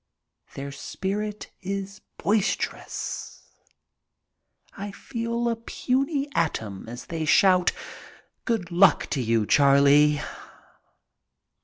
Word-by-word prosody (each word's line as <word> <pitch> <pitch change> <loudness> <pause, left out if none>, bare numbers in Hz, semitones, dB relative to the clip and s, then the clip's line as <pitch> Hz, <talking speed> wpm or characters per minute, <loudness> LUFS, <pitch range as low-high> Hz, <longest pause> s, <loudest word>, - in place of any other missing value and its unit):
Their 140 +1 -5
spirit 205 +8 -4
is 195 +1 -5 0.2
boisterous. 210 +1 -2 1.2
I 200 +1 -5
feel 235 +3 -3
a 230 - +1
puny 275 +5 -1
atom 110 - -2
as 120 +1 -8
they 165 -1 -4
shout, 180 +3 +4 0.7
"Good 220 -7 -1
luck 185 +3 +5
to 135 - 0
you, 115 -2 +1
Charlie." 145 +3 +5
190 Hz, 90 wpm, -25 LUFS, 140-215 Hz, 1.2 s, luck